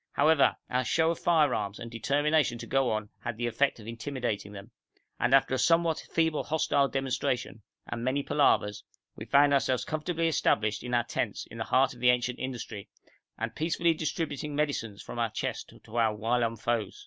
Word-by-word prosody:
However, 150 0 +4
our 125 +1 0
show 160 +6 +2
of 170 - -4
firearms 140 - +2
and 115 0 -8
determination 145 +2 +1
to - - -7
go 135 -1 +1
on 110 -1 -2
had 120 -3 -5
the 120 - -2
effect 120 +3 +1
of 105 - -11
intimidating 115 -3 -4
them, 105 +3 -10 0.5
and 120 - +1
after 135 -1 +4
a 130 - +1
somewhat 165 +5 +2
feeble 160 -2 +1
hostile 145 -3 +2
demonstration 130 -4 -2 0.2
and 120 -1 -5
many 135 +3 0
palavers, 105 -9 +2 0.3
we - - -8
found 140 0 +5
ourselves 130 -2 +1
comfortably 165 +2 -1
established 110 -9 +1
in 125 0 -2
our 120 - +3
tents - - -3
in - - -9
the - - -2
heart 135 +1 +3
of 125 - -15
the 125 0 +4
ancient 125 0 +1
industry, 120 -5 -6 0.5
and - - -3
peacefully 165 +1 +1
distributing 150 -2 -3
medicines 140 -9 -2
from - - -7
our 115 -1 +1
chest - - -4
to 110 - -12
our 110 -2 +2
whilom 115 +1 0
foes. 115 -2 -2
125 Hz, 185 wpm, -29 LUFS, 115-150 Hz, 0.5 s, found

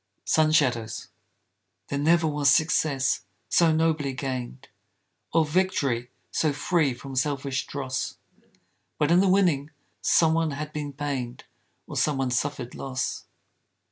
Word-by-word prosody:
SUN 155 -1 +3
SHADOWS 125 -8 +1 0.8
There 140 - -1
never 165 +3 +3
was 145 -2 +2
success 145 -3 +2 0.3
so 170 -2 +4
nobly 155 -3 +1
gained, 130 -1 -5 0.6
Or 165 -1 +3
victory 150 -8 0 0.2
so 155 -2 +1
free 145 -2 +1
from 135 +2 -9
selfish 135 -1 -1
dross, 130 -3 -3 0.8
But 150 +1 +1
in 175 - +6
the 195 0 +4
winning 175 -7 +3 0.3
some 160 -1 +4
one 165 -1 +1
had 150 0 -5
been 150 -1 -4
pained 135 -3 -4 0.4
Or - - -8
some 150 -3 +1
one 130 -2 -1
suffered 125 0 -2
loss. 130 -2 -3
145 Hz, 130 wpm, -26 LUFS, 130-160 Hz, 0.8 s, in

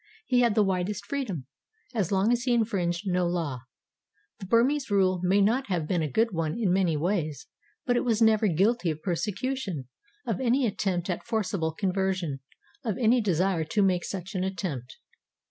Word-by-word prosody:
He 250 -2 +2
had 235 -4 +3
the 215 - +5
widest 195 +1 -1
freedom, 205 - -3 0.5
as 205 -7 -1
long 195 +3 +3
as 240 0 +2
he 245 -1 +2
infringed 195 -6 0
no 180 -2 +1
law. 165 -7 -2 0.8
The 190 - -8
Burmese 260 +6 +2
rule 185 -3 +2
may 190 +3 +3
not 235 +7 +2
have 175 -6 -1
been 175 -1 +1
a 155 - -1
good 225 - +2
one 165 -1 -2
in 195 -6 +2
many 180 -5 +2
ways, 160 -3 -1 0.4
but 245 - +2
it - - +1
was 230 -3 +1
never 220 -1 +4
guilty 195 +3 +2
of 155 -1 -4
persecution, 195 - -2 0.4
of 225 -3 -2
any 255 +1 +2
attempt 190 -5 -1
at 175 - -5
forcible 200 -8 -1
conversion, 185 -5 -1 0.4
of 220 -6 -2
any 240 +1 +3
desire 185 -3 +1
to 205 +6 +1
make 180 -2 +2
such 195 +1 -5
an 185 -2 -1
attempt. 170 -10 -4
195 Hz, 180 wpm, -27 LUFS, 175-225 Hz, 0.8 s, the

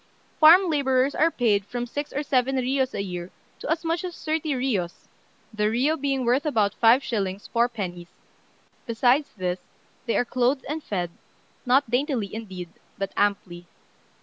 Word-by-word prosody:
Farm 345 +5 +8
labourers 275 -3 +2
are 325 - +3
paid 220 -9 +1
from 240 +4 -4
six 290 +4 -5
or 290 - -2
seven 270 -2 +1
riyos 260 +1 0
a 200 - -2
year 180 -2 -6 0.3
to - - -6
as 325 +1 -1
much 330 +2 -1
as 360 -2 -6
thirty 315 0 -1
riyos 230 -10 -2 0.5
(the 210 -1 0
riyo 260 +8 +1
being 275 -4 -1
worth 250 +4 +2
about 215 -9 +1
5s. 240 +4 +5 0.5
4d.); 200 -8 -1 0.8
besides 245 +5 +2
this, 180 -1 -2 0.5
they 230 - +1
are 245 - +2
clothed 255 +3 0
and 305 +2 -4
fed, 180 -4 -3 0.6
not 255 -1 +3
daintily 245 - 0
indeed, 190 -6 -7 0.3
but 195 0 -4
amply. 185 -4 -1
245 Hz, 150 wpm, -25 LUFS, 205-285 Hz, 0.8 s, Farm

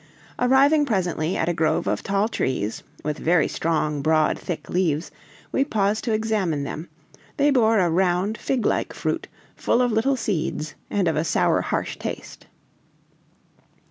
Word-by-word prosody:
Arriving 275 +4 +4
presently 180 - -1
at 160 - 0
a 175 - +1
grove 160 -1 +1
of - - -1
tall 200 +2 +1
trees, 120 - -2 0.2
with 150 0 -3
very 165 -1 +3
strong, 155 -3 -1
broad 155 +1 +3
thick 175 - -6
leaves, 170 -3 0 0.4
we 270 - +2
paused 210 -5 0
to 235 - -1
examine 215 -9 0
them; 155 +4 -6 0.5
they 290 +1 +4
bore 225 -4 +4
a 185 -3 +3
round, 180 +4 +1
fig 250 0 -2
like - - 0
fruit, - - -2 0.3
full - - +1
of 245 -1 +2
little 230 +5 +2
seeds 160 -8 -2 0.2
and 195 -3 +1
of 160 - +1
a 155 - +1
sour, 165 - +2
harsh - - -3
taste. - - -7
185 Hz, 155 wpm, -23 LUFS, 160-225 Hz, 0.5 s, Arriving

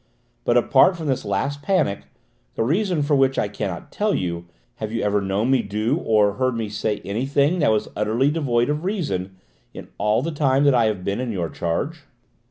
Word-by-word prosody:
But, 120 - +3
apart 135 +9 +4
from 160 - -6
this 130 -3 -1
last 135 +8 -2
panic, 165 - 0 0.5
the - - 0
reason 170 - +1
for 145 0 +2
which 135 -1 +2
I - - +1
cannot 100 -3 -5
tell 210 0 0
you, 85 -1 -3 0.3
have 110 -1 -5
you 115 - -2
ever 105 0 +1
known 100 +6 0
me 130 -2 +4
do, 105 +2 -1
or 105 -2 +2
heard 130 -1 +1
me 110 -2 -3
say, 105 0 -2
anything 140 - +1
that 150 - +3
was 110 -1 +1
utterly 110 +7 +1
devoid 125 -7 +1
of 150 +2 -3
reason, 100 - -2 0.4
in - - -9
all 105 +4 +2
the 165 - -2
time 140 -2 +2
that 140 -1 +5
I 120 -2 +4
have 105 -4 -1
been 100 +4 -2
in 125 -2 -2
your 90 -5 -2
charge?" 145 - -3
120 Hz, 200 wpm, -22 LUFS, 105-145 Hz, 0.5 s, that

